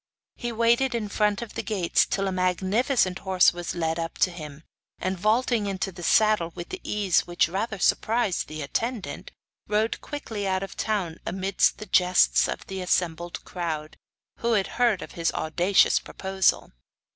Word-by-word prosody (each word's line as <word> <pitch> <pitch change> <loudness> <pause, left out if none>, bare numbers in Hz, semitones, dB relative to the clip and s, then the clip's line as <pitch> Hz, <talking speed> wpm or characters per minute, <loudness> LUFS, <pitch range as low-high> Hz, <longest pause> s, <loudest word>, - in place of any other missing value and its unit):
He 240 - -4
waited 235 +3 +2
in 215 -3 -2
front 210 +1 +1
of 225 - -10
the - - -3
gates 190 -6 +1
till 195 0 -1
a - - -1
magnificent 185 +3 +1
horse 190 -2 +4
was 175 0 -5
led 165 -1 -1
up 165 0 -4
to 185 - -8
him, 155 -3 -9 0.3
and 185 +1 -2
vaulting 215 +3 +1
into 195 0 -2
the 175 -1 -11
saddle 210 -2 +3
with 175 - -8
an 375 - -4
ease 200 -4 +1
which 175 0 +2
rather 195 +5 -3
surprised 215 +1 +1
the 155 0 -6
attendant, 205 - -3 0.4
rode 215 +2 0
quickly 225 -9 -5
out 190 0 0
of 195 - -6
the - - -2
town 190 -7 -2
amidst 190 +1 +1
the 215 - -8
jests 180 -2 +4
of - - -5
the 190 -1 -5
assembled 175 -1 -1
crowd, 160 -4 -4 0.4
who 235 0 0
had 200 -3 +2 0.2
heard 230 -6 +3
of - - -10
his 165 -1 -1
audacious 175 +5 +3
proposal. 190 -1 0
190 Hz, 170 wpm, -26 LUFS, 175-215 Hz, 0.4 s, horse